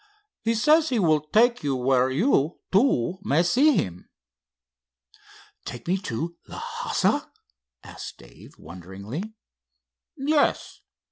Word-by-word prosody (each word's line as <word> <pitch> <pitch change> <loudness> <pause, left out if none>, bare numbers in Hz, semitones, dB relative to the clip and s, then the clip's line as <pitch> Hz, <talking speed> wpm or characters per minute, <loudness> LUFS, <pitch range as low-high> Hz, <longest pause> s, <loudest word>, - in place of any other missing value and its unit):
He 230 +1 +1
says 305 +7 +4
he 250 - 0
will 160 -7 +3
take 230 - +2
you 140 -2 0
where 130 0 +2
you, 155 - +1
too, 190 - +2
may 165 -2 +2
see 265 - +4
him." 90 -1 -3 1.5
"Take 120 +3 -8
me 175 - +2
into 170 - -4
Lhassa?" - - -2 0.5
asked - - -9
Dave, - - -16
wonderingly. 100 - -8 0.8
"Yes. 290 +2 0
170 Hz, 110 wpm, -25 LUFS, -, 1.5 s, says